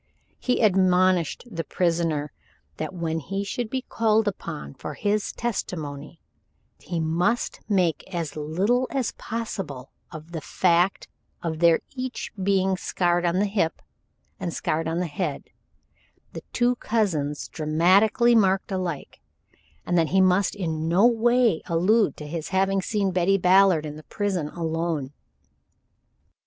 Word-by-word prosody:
He 250 -2 0
admonished 185 -4 +3
the 170 -9 -5
prisoner 165 -3 0 0.5
that 155 - -4
when 165 -3 -2
he 195 +6 -3
should 220 +3 -3
be 260 +1 -2
called 220 -2 +1
upon 70 - -5
for 150 - -7
his 210 0 0
testimony, 160 -10 -4 0.6
he 175 -2 -4
must 175 +9 0
make 180 -6 +1
as 170 -4 -3
little 190 +12 0
as 265 -4 -1
possible 190 - -5 0.2
of 155 0 -10
the 165 -2 -5
fact 175 +4 +1 0.4
of 160 -2 -3
their 170 -1 +5
each 260 -1 -5
being 190 -1 +2
scarred 175 -2 0
on 170 +1 +1
the 200 - +2
hip, 195 -5 0 0.6
and 170 - -3
scarred 160 +1 -1
on 165 +1 -1
the 180 - 0
head, 150 -4 -4 0.8
the - - -6
two 245 0 +1
cousins 165 -13 -1
dramatically 185 +10 +3
marked 195 -3 +3
alike, 180 -6 -4 0.7
and 175 -1 +2
that 165 - +2
he 190 - +3
must 185 +1 +3
in 160 -5 -2
no 180 +6 +4
way 240 -4 +3
allude 185 +1 +2
to 150 - -8
his 160 +1 -5
having 195 +1 +1
seen 200 -1 0
Betty 185 +2 +2
Ballard 185 -3 +4
in 150 0 -6
the 155 - -11
prison 195 -7 -2
alone. 160 -3 -3
180 Hz, 140 wpm, -25 LUFS, 160-205 Hz, 0.8 s, their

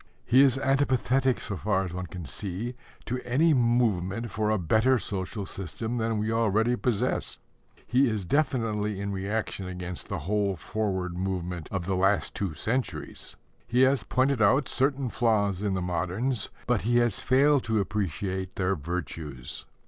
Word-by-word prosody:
He 130 +2 +6
is 135 -1 +5
antipathetic, 135 -1 +2
so 100 - -4
far 95 +1 +1
as 90 - -6
one 90 0 -4
can 85 +1 -7
see, 100 - -4 0.3
to 125 +1 -3
any 150 +7 +3
movement 115 -4 +1
for 105 +2 0
a 110 - +2
better 110 +9 +3
social 100 -1 -2
system 110 +6 -4
than 115 -1 0
we 105 +1 -1
already 115 +1 +2
possess. 120 -4 -1 0.5
He 130 +1 +3
is 105 -4 -2
definitely 110 - 0
in 100 0 -3
reaction 100 0 -3
against 90 -1 -6
the - - -3
whole 100 0 +1
forward 95 -1 -2
movement 90 -3 -3
of 95 -3 -3
the 95 +1 0
last 95 0 +2
two 95 -6 -3
centuries. 120 +9 -3 0.3
He 125 +1 +2
has 130 -1 +4
pointed 130 -2 +1
out 130 +7 +4
certain 135 0 +1
flaws 105 -5 +1
in 100 -2 0
the 90 - -1
moderns, 95 +8 -1 0.2
but 125 -4 +1
he 120 +2 +2
has 120 -4 +2
failed 140 +1 +4
to 110 -2 +1
appreciate 95 -1 -2
their 95 0 +1
virtues. 80 -5 -5
105 Hz, 160 wpm, -27 LUFS, 95-125 Hz, 0.5 s, He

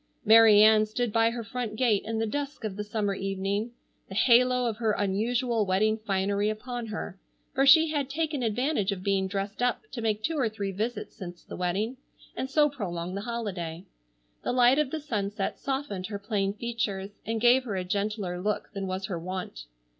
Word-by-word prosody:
Mary 220 -1 +8
Ann 215 0 +6
stood 225 0 -2
by 225 0 +4
her 235 0 -4
front 230 -1 -4
gate 220 -4 +2
in 225 +1 -2
the 225 - 0
dusk 285 +4 -4
of 210 -3 -3
the 210 - -3
summer 210 -1 -1
evening, 195 +3 -2 0.4
the 190 - -7
halo 250 +2 +4
of 225 -3 -1
her 225 -2 +1
unusual 225 +4 0
wedding 205 +3 +2
finery 205 -1 0
upon 240 +2 -5
her, 205 -3 -6 0.3
for 270 +1 +2
she 320 +3 +8
had 285 -3 -1
taken 305 -1 -1
advantage 235 -1 0
of 185 -2 -5
being 195 -1 +1
dressed 200 +3 -4
up 245 - +1
to 235 - -5
make 215 -1 -1
two 320 +2 -1
or 240 -4 +2
three 205 -2 -4
visits 215 +3 -4
since 175 -2 -9
the - - -9
wedding, 200 +8 -1 0.4
and 260 - -3
so 295 +2 +4
prolong 180 - -4
the 200 - -3
holiday. 195 -7 -4 0.6
The - - -1
light 250 +2 +5
of 300 -3 +1
the 315 - -3
sunset 205 -8 -3
softened 265 -9 -3
her 205 -1 -4
plain 200 -1 -1
features, 210 -4 -3
and 225 +1 -2
gave 245 +3 +5
her 210 -5 -3
a 185 - -1
gentler 200 -1 -2
look 210 +2 -2
than 195 -1 -4
was 185 +1 -3
her 180 -3 -4
wont. 180 - -6
215 Hz, 195 wpm, -28 LUFS, 195-245 Hz, 0.6 s, Mary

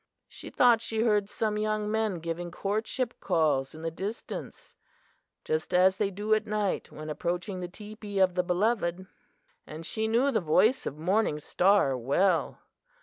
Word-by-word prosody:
She - - -10
thought 240 -2 +4
she 225 -1 -1
heard 210 -3 +2
some 210 0 -1
young 215 0 -1
men 215 -6 -1
giving 170 +1 -4
courtship 215 +7 -2
calls 155 -6 +1
in 160 - -10
the 165 - -2
distance, 200 +7 -7 0.7
just 155 +3 -1
as 185 +1 +5
they 200 -1 +1
do 205 +3 -1
at 215 - +1
night 210 -2 -1
when 155 0 -8
approaching 180 +5 -3
the 180 - -4
teepee 210 +2 -8
of 190 -2 +4
the 180 - +2
beloved; 180 0 0 0.6
and 160 +1 -8
she 220 +4 -2
knew 240 +5 +2
the 220 -5 +1
voice 190 +10 +3
of 145 - -5
Morning 185 0 +1
Star 180 -3 +3
well! 160 +9 +1
195 Hz, 160 wpm, -28 LUFS, 170-215 Hz, 0.7 s, as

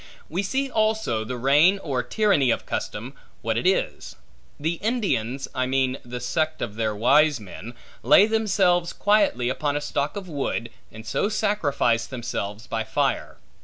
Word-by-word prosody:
We 175 +5 -1
see 265 +8 -1
also 220 - 0
the 125 +3 -5
reign 145 +10 +4
or 140 -9 -2
tyranny 195 - +2
of - - 0
custom, - - -4 0.3
what - - 0
it - - 0
is. - - -1 0.4
The 160 +3 -2
Indians 165 - -1
(I 130 0 0
mean 130 0 0
the 125 0 -6
sect 155 +5 -1
of 110 - -4
their 110 -1 -1
wise 145 +5 +4
men) 105 +3 -10 0.3
lay 200 - +6
themselves 195 -6 +2
quietly 200 - +2
upon 145 +3 -1
a - - 0
stock 145 +2 -2
of 200 -2 -6
wood, 135 -6 -3 0.2
and 110 +1 -11
so 200 - 0
sacrifice 145 - +1
themselves 115 -4 -5
by 115 -1 -2
fire. 110 - -1
145 Hz, 160 wpm, -24 LUFS, 120-195 Hz, 0.4 s, lay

